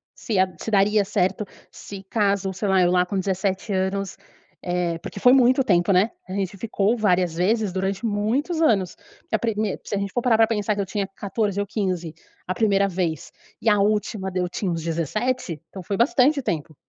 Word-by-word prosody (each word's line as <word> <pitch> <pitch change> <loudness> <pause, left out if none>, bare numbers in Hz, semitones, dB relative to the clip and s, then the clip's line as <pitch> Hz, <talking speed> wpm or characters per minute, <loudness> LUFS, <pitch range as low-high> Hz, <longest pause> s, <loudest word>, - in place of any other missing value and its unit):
se, 215 -6 -2
eh, 185 -1 +1
se 225 - -5
daria 205 +1 +3
certo, 195 +1 0 0.2
se 195 -1 -10
caso, 200 -3 +1
sei 200 +2 -2
lá, 190 -1 +4
eu 175 - +4
lá 180 0 +3
com 190 +1 -2
17 190 +2 -2
anos 190 +1 -2 0.4
eh, 175 -2 -1
porque 200 - -8
foi 250 +4 +6
muito 260 0 +5
tempo, 175 -5 +2
né? 195 +4 +4 0.2
A - - -7
gente 195 0 -2
ficou 210 +1 0
várias 180 -5 +1
vezes 200 +2 +1
durante 195 +3 -2
muitos 235 - 0
anos. 200 - +2 0.3
E - - +1
a - - 0
primeir 215 -3 -1
se - - -7
a - - 0
gente 200 -1 -4
for 245 - 0
parar 235 -3 +3
pra 225 -1 +5
pensar 210 -1 0
que 205 - -5
eu - - -2
tinha 200 +1 -2
14 205 -1 -1
ou 205 - -1
15, 185 -6 -2 0.3
a 185 - 0
primeira 200 -1 +2
vez 170 -5 -3 0.3
e - - -5
a 210 - +4
última 205 -2 0
deu 180 -1 -1
tinha 180 +1 -3
uns 165 -1 -3
17, 170 - -2
então 190 -2 -9
foi 200 +3 -3
bastante 275 +4 +3
tempo. 160 - -3
200 Hz, 205 wpm, -23 LUFS, 185-220 Hz, 0.4 s, foi